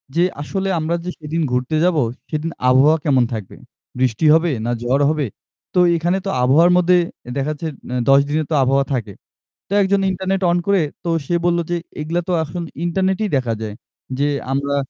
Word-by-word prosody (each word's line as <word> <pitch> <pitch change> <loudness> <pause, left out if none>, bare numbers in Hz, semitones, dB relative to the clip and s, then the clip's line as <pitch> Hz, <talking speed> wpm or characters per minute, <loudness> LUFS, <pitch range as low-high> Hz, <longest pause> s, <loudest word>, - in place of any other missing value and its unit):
যে, 175 - +4 0.2
আসলে 195 +6 -3
আমরা 160 +2 -1
যে 180 - -4
সেদিন 160 +2 -3
ঘুরতে 125 +4 -1
যাবো; 175 -4 +3 0.3
সেদিন 155 +1 -3 0.2
আবহাওয়া 145 +5 +5
কেমন 130 -4 +4
থাকবে? 105 -4 -6 0.4
বৃষ্টি 125 +2 +1
হবে 165 +1 +3
না 120 - 0
ঝড় 135 +4 +2
হবে? 150 -2 -1 0.5
তো 180 - +2 0.2
এখানে 175 +3 0
তো 195 - -1
আবহাওয়ার 160 +8 +5
মধ্যে 180 0 +4 0.4
দেখা 140 +2 -1
যাচ্ছে 160 +2 -5 0.2
অ্যা 125 - -2
১০ 135 0 +7
দিনে 155 +2 0
তো - - +2
আবহাওয়া 135 +1 +2
থাকে। 115 -6 -3 0.5
তো - - -25
একজন 195 +1 +2
ইন্টারনেট 190 +1 -2
অন 175 - +2
করে 200 -3 +3 0.2
তো 170 - -2 0.2
সে 175 - 0
বলল 175 0 +2
যে, - - +1
"এগুলো 170 - -15
তো - - -26
এইগুলা 165 +3 -1
তো 180 - +1
এখন 165 +3 -5 0.2
ইন্টারনেটেই 190 +4 0
দেখা 125 -3 -1
যায়।" 105 -2 -5 0.4
যে 145 - +2 0.2
আমরা 140 +1 0
155 Hz, 195 wpm, -19 LUFS, 135-175 Hz, 0.5 s, ১০